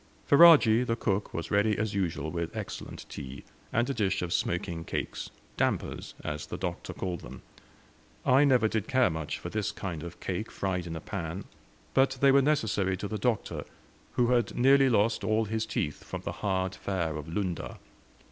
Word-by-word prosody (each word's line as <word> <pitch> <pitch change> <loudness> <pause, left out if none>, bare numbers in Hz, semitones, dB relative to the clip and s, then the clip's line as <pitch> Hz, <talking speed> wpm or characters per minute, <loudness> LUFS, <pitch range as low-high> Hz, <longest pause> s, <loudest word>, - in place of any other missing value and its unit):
Ferajji, 140 -7 +8
the 115 -2 0
cook, 100 -3 -1
was 85 - -5
ready 105 +1 +3
as 110 -1 -1
usual 85 -6 -1
with 85 -1 -3
excellent - - -6
tea, 65 +1 -8 0.3
and 120 +2 +1
a 140 - -1
dish 95 -6 0
of 85 -1 -2
smoking 85 -1 -1
cakes; - - -4 0.3
"dampers," - - -1
as 75 -1 -4
the - - -5
Doctor - - -4
called 90 -3 -4
them. 65 +2 -10 0.8
I 130 +3 +6
never 125 -6 +4
did 110 -2 -2
care 130 -6 +3
much 80 -2 -3
for - - -7
this 105 -2 -1
kind 85 -5 -5
of 85 +1 -7
a - - -28
cake 95 +4 -3
fried 90 -3 -2
in 80 - -5
a 80 - -5
pan, 90 +1 -4 0.5
but 135 0 +3
they 140 0 +6
were 140 +1 +6
necessary 110 -10 +1
to 100 - -4
the 105 +1 -4
Doctor, 115 0 -1 0.5
who 120 -1 +2
had 120 -2 +2
nearly 135 +2 +6
lost 110 -1 +2
all 110 +1 +2
his 110 +1 -2
teeth 75 -8 -2
from - - -6
the - - -4
hard 95 -2 0
fare 85 -7 -2
of 75 0 -6
Lunda. 90 +1 -3
100 Hz, 185 wpm, -29 LUFS, 85-120 Hz, 0.8 s, Ferajji